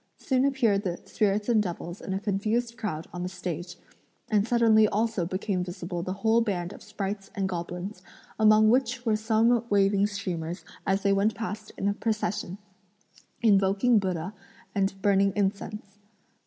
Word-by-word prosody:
Soon 260 0 +1
appeared 240 -8 +2
the 180 -4 -3
spirits 205 0 0
and 230 -3 +4
devils 175 -1 -5
in - - -6
a 190 - -1
confused 215 +4 -1
crowd 175 -9 -4
on 180 - -5
the 180 - -2
stage, 180 -1 -5 0.5
and 210 0 +3
suddenly 225 -2 +5
also 210 -4 0
became 185 0 -1
visible 175 -1 -5
the 185 - -4
whole 225 +1 +5
band 190 -4 -2
of - - -13
sprites 200 -2 -5
and 195 -1 0
goblins, 180 +2 -5 0.4
among 215 0 +6
which 250 -1 +1
were 220 -2 +3
some 225 +2 +2
waving 200 0 +3
streamers, 180 -4 -4 0.2
as 195 +1 +1
they 200 -1 +3
went 200 +3 +2
past 215 -1 -5
in 195 - -1
a 200 - +2
procession, 210 -3 -2 0.9
invoking 205 +2 +4
Buddha 185 -1 -3 0.4
and 195 -1 0
burning 195 -1 +3
incense. 205 +1 -2
200 Hz, 155 wpm, -27 LUFS, 185-220 Hz, 0.9 s, among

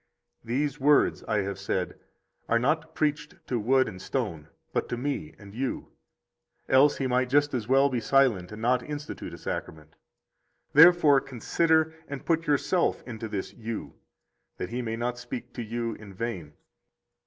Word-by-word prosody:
65 - - -24
These 145 0 -1
words, 145 +2 +3
I 110 - +1
have 100 0 -4
said, 95 -1 -2 0.5
are 115 - +4
not 160 +6 0
preached 150 -1 -1
to 125 - -1
wood 130 +4 +3
and 95 -4 -8
stone, 95 - -3 0.3
but - - -1
to 120 - -2
me 145 +4 -3
and 100 -1 -13
you; 130 +3 -3 0.8
else 135 +3 +5
He 135 - -1
might 125 0 +1
just 145 +2 +3
as 115 -4 -2
well 135 +2 +5
be 130 -3 -1
silent 115 -8 +2
and 105 +1 -8
not 125 +1 +3
institute 150 +2 -6
a - - -8
Sacrament. 75 -1 -6 0.8
Therefore 155 -3 +7
consider, 160 +5 +1
and 140 -1 -7
put 165 0 +1
yourself 150 +5 +1
into 115 -2 -6
this 100 -3 -4
You, 115 -1 -6 0.6
that 90 - -4
He 125 +1 -2
may 115 -2 -3
not 120 +1 -3
speak 125 0 -7
to 120 - -5
you 115 +1 -3
in 105 -3 -12
vain. 95 -9 -4
125 Hz, 165 wpm, -27 LUFS, 110-145 Hz, 0.8 s, Therefore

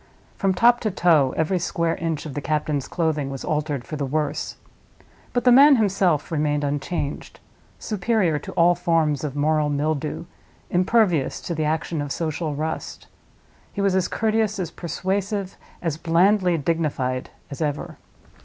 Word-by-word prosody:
From 195 -1 0
top 240 +5 +5
to 220 - -1
toe 165 -8 +3
every 170 +4 +1
square 170 -2 0
inch 165 -2 -3
of 150 - -6
the 145 - -4
captain's 150 -2 -1
clothing 155 -5 -1
was 135 -1 -6
altered 150 -4 -2
for 155 - -5
the 145 - -2
worse; 150 +2 -2 0.8
but 245 - 0
the 250 - +6
man 280 +3 +8
himself 190 - +1
remained 150 -2 0
unchanged—superior 170 +5 -2
to - - -8
all 170 +1 +5
forms 160 -5 +1
of 145 -2 -4
moral 150 +1 +1
mildew, 150 +2 -2 0.5
impervious 180 - +2
to 170 - -4
the 155 -1 -1
action 160 0 -1
of 145 -1 -4
social 155 -1 -2
rust. 155 +2 -4 0.7
He - - -7
was 195 -1 +2
as 190 -1 +1
courteous, 220 -1 0
as 175 -4 -3
persuasive, 195 +3 -3 0.3
as 160 -3 -1
blandly 180 +2 +3
dignified 140 -5 -1 0.2
as 140 - -7
ever. 150 -2 -3
165 Hz, 150 wpm, -23 LUFS, 150-190 Hz, 0.8 s, man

